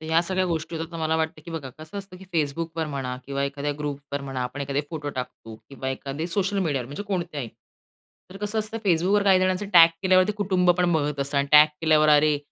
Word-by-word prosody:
तर -, -, -10 dB
ह्या 160 Hz, +1 st, +3 dB
सगळ्या 185 Hz, +1 st, 0 dB
गोष्टी 165 Hz, -1 st, -3 dB
होतात 165 Hz, +1 st, -5 dB
तर -, -, -5 dB
मला 160 Hz, 0 st, 0 dB
वाटतं, 160 Hz, -1 st, -2 dB
की -, -, -9 dB
बघा 155 Hz, -5 st, -5 dB
कसं 155 Hz, +5 st, -8 dB
असतं, 195 Hz, -2 st, -10 dB
की 190 Hz, -, -13 dB
Facebookवर 160 Hz, +1 st, -1 dB
म्हणा 135 Hz, -4 st, -4 dB
किंवा 140 Hz, 0 st, -2 dB
एखाद्या 140 Hz, +1 st, -3 dB
ग्रुपवर 145 Hz, -1 st, -4 dB
म्हणा, 135 Hz, -2 st, -5 dB
आपण 125 Hz, +3 st, -5 dB
एखादे 140 Hz, 0 st, -1 dB
फोटो 155 Hz, -3 st, -4 dB
टाकतो 125 Hz, -4 st, -7 dB
किंवा 135 Hz, -1 st, -5 dB
एखादे 135 Hz, +4 st, -4 dB
सोशल 200 Hz, +3 st, -1 dB
मीडियावर 145 Hz, -9 st, -1 dB
म्हणजे 145 Hz, +9 st, -6 dB
कोणत्याही. 175 Hz, -, -3 dB, 0.8 s
तर 190 Hz, -, -10 dB
कसं 210 Hz, +2 st, -3 dB
असतं 215 Hz, +1 st, -3 dB
Facebookवर 185 Hz, +4 st, +3 dB
काही 190 Hz, -2 st, +5 dB
जणांचं 185 Hz, +2 st, 0 dB
टॅग 165 Hz, -2 st, +9 dB
केल्यावर 185 Hz, -1 st, +5 dB
ते -, -, +1 dB
कुटुंबपण 180 Hz, -3 st, +2 dB
बघत 145 Hz, -3 st, 0 dB
असतं 140 Hz, +1 st, 0 dB
आणि 140 Hz, -, +1 dB
टॅग 150 Hz, 0 st, +9 dB
केल्यावर, 155 Hz, -1 st, +4 dB
अरे! 150 Hz, 0 st, +5 dB
160 Hz, 215 wpm, -25 LUFS, 140-185 Hz, 0.8 s, टॅग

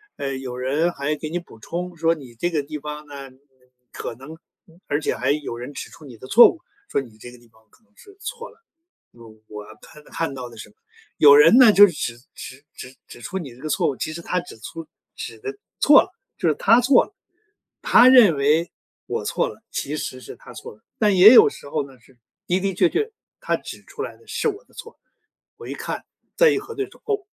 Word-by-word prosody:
呃， 135 Hz, -1 st, -4 dB
有 130 Hz, -2 st, -7 dB
人 145 Hz, +7 st, 0 dB
还 140 Hz, +2 st, -2 dB
给 155 Hz, +1 st, -7 dB
你 175 Hz, -, -3 dB
补 170 Hz, -10 st, -11 dB
充 175 Hz, +9 st, -6 dB
说 165 Hz, 0 st, +1 dB
你 135 Hz, -6 st, -13 dB
这 145 Hz, +10 st, -2 dB
个 155 Hz, -4 st, -2 dB
地 150 Hz, +1 st, -7 dB
方 150 Hz, +1 st, -8 dB
呢， 140 Hz, -2 st, -10 dB
嗯， 130 Hz, -, -23 dB, 0.5 s
可 -, -, -6 dB
能 135 Hz, +6 st, -12 dB, 0.5 s
而 145 Hz, +1 st, -1 dB
且 -, -, -2 dB
还 -, -, -2 dB
有 145 Hz, -5 st, -2 dB
人 120 Hz, +4 st, -8 dB
指 -, -, -8 dB
出 155 Hz, -, -15 dB
你 120 Hz, -4 st, -12 dB
的 130 Hz, -, -12 dB
错 215 Hz, -, +7 dB
误， 335 Hz, -, -8 dB, 0.3 s
说 -, -, 0 dB
你 115 Hz, -5 st, -15 dB
这 120 Hz, +2 st, -11 dB
个 125 Hz, -, -15 dB
地 120 Hz, 0 st, -22 dB
方 110 Hz, 0 st, -27 dB
可 -, -, -28 dB
能 225 Hz, -1 st, -37 dB
是 400 Hz, -, -18 dB
错 480 Hz, +2 st, -7 dB
了。 -, -, -23 dB, 0.5 s
嗯， 120 Hz, -, -23 dB, 0.3 s
我 105 Hz, -1 st, -9 dB, 0.2 s
看 150 Hz, 0 st, -16 dB
看 165 Hz, -4 st, -4 dB
到 125 Hz, -2 st, -7 dB
的 115 Hz, -, -15 dB
是 105 Hz, -1 st, -11 dB, 0.4 s
有 145 Hz, -1 st, +8 dB
人 155 Hz, +9 st, +7 dB
呢， 245 Hz, -4 st, +8 dB
就 205 Hz, 0 st, +8 dB
是 180 Hz, -, -2 dB
指 120 Hz, -5 st, -4 dB, 0.2 s
指 130 Hz, +2 st, -11 dB
指 130 Hz, +1 st, -11 dB
指 120 Hz, -, -13 dB
出 190 Hz, +10 st, -5 dB
你 140 Hz, -9 st, -7 dB
这 125 Hz, -, -17 dB
个 155 Hz, -, -5 dB
错 -, -, +1 dB
误， 140 Hz, -, -4 dB
其 155 Hz, -, -4 dB
实 160 Hz, -, -7 dB
他 180 Hz, -, -1 dB
指 175 Hz, -9 st, -11 dB
出 160 Hz, +8 st, -9 dB, 0.3 s
指 -, -, -8 dB
得 415 Hz, -1 st, -7 dB, 0.2 s
错 290 Hz, -1 st, +7 dB
了， 370 Hz, -, -8 dB, 0.3 s
就 -, -, +1 dB
是 -, -, +1 dB
他 235 Hz, +2 st, +4 dB
错 250 Hz, +1 st, +4 dB
了。 -, -, -23 dB, 0.7 s
他 485 Hz, -, +6 dB
认 230 Hz, -, +7 dB
为 150 Hz, +5 st, +1 dB, 0.3 s
我 -, -, -4 dB
错 -, -, -1 dB
了， -, -, -14 dB
其 145 Hz, -, -4 dB
实 130 Hz, -, -5 dB
是 -, -, -10 dB
他 -, -, -14 dB
错 -, -, -10 dB
了。 105 Hz, -, -24 dB, 0.2 s
但 210 Hz, -3 st, +2 dB
也 190 Hz, +5 st, +9 dB
有 435 Hz, +10 st, +8 dB
时 145 Hz, -, -8 dB
候 145 Hz, -1 st, -2 dB
呢， 130 Hz, -3 st, -17 dB
是 125 Hz, +1 st, -25 dB, 0.3 s
的 180 Hz, +1 st, +1 dB
的 195 Hz, 0 st, -2 dB
确 335 Hz, -, +2 dB
确 430 Hz, +5 st, -2 dB, 0.3 s
他 -, -, -1 dB
指 -, -, -10 dB
出 -, -, -10 dB
来 -, -, -6 dB
的 455 Hz, -, -24 dB
是 -, -, -2 dB
我 415 Hz, +2 st, -4 dB
的 -, -, -29 dB
错， 460 Hz, -, -12 dB, 0.6 s
我 -, -, -12 dB
一 -, -, -6 dB
看， -, -, -6 dB, 0.3 s
再 -, -, +5 dB
一 415 Hz, -, 0 dB
核 445 Hz, +2 st, -9 dB
对 405 Hz, -, -2 dB
说， -, -, -20 dB
哦， 410 Hz, -3 st, -2 dB
155 Hz, 255 characters per minute, -22 LUFS, 130-220 Hz, 0.7 s, 也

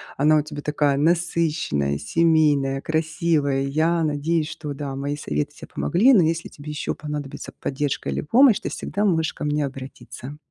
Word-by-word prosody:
Она 155 Hz, +2 st, +4 dB
у -, -, +3 dB
тебя 150 Hz, -1 st, -7 dB
такая 145 Hz, -1 st, +1 dB
насыщенная, 160 Hz, -, 0 dB
семейная, 145 Hz, -, +2 dB
красивая. 155 Hz, -3 st, 0 dB
Я 160 Hz, +5 st, +1 dB
надеюсь, 155 Hz, +1 st, 0 dB
что 150 Hz, -3 st, -6 dB
да, 140 Hz, -1 st, -5 dB
мои 140 Hz, +1 st, -3 dB
советы 145 Hz, 0 st, -2 dB
тебе -, -, -12 dB
помогли. 225 Hz, +10 st, +3 dB
Но 190 Hz, -8 st, +6 dB
если 165 Hz, +1 st, -1 dB
тебе 150 Hz, +1 st, -9 dB
ещё 150 Hz, -, -3 dB
понадобится 150 Hz, -2 st, -6 dB
поддержка 140 Hz, 0 st, -2 dB
или -, -, -1 dB
помощь, 235 Hz, -, +5 dB
ты -, -, -3 dB
всегда 205 Hz, -, -3 dB
можешь 160 Hz, -4 st, +1 dB
ко -, -, -7 dB
мне 150 Hz, 0 st, 0 dB
обратиться. 135 Hz, +1 st, -9 dB
150 Hz, 165 wpm, -23 LUFS, 140-165 Hz, -, Но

